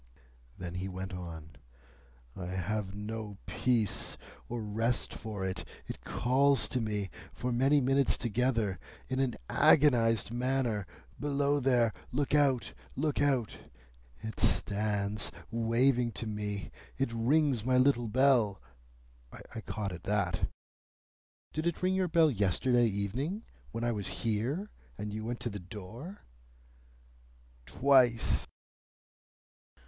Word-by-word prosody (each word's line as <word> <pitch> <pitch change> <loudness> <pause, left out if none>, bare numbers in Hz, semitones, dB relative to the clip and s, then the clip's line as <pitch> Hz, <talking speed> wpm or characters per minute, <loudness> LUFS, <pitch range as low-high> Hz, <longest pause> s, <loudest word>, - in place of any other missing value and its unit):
Then 90 -1 -6
he 95 - -3
went 95 +1 -5
on. 80 -3 -8 0.8
"I 90 -2 -5
have 95 +2 -3
no 105 0 -5
peace 120 -5 0 0.3
or 120 -2 -3
rest 115 +3 0
for 105 -4 -5
it. 95 0 -3 0.2
It - - -8
calls 135 +3 +2
to 125 - -1
me, 105 -4 -2 0.2
for 125 - -3
many 135 +5 +4
minutes 135 +1 +2
together, 115 -5 0 0.3
in 130 0 -1
an 130 -3 +1
agonised 115 -7 +4
manner, 120 -5 0 0.3
'Below 145 0 +1
there! 120 -4 +3 0.2
Look 140 +2 -1
out! 140 -4 +3 0.2
Look 150 +1 0
out!' 135 -6 +1 0.6
It 110 -1 -6
stands 105 0 +2 0.2
waving 120 +1 +2
to - - -5
me. 105 -2 -4 0.3
It 135 -4 -1
rings 130 +1 +2
my 130 +1 +3
little 130 -2 +3
bell—" 120 -4 +3 0.9
I 110 - -5
caught 105 -2 -4
at 90 - -9
that. 105 0 0 1.0
"Did 155 +2 -1
it 170 +1 -2
ring 185 +1 +3
your 190 -1 +1
bell 160 -2 +4
yesterday 120 +4 +2
evening 120 - -2 0.3
when 115 +1 -4
I 120 - +1
was 105 -4 -1 0.2
here, 125 - -1 0.3
and 105 +1 -5
you 110 0 -4
went 120 +2 -3
to 120 - -2
the 100 - -5
door?" 110 - -9 1.4
"Twice." 125 -4 +4
115 Hz, 125 wpm, -31 LUFS, 105-135 Hz, 1.4 s, many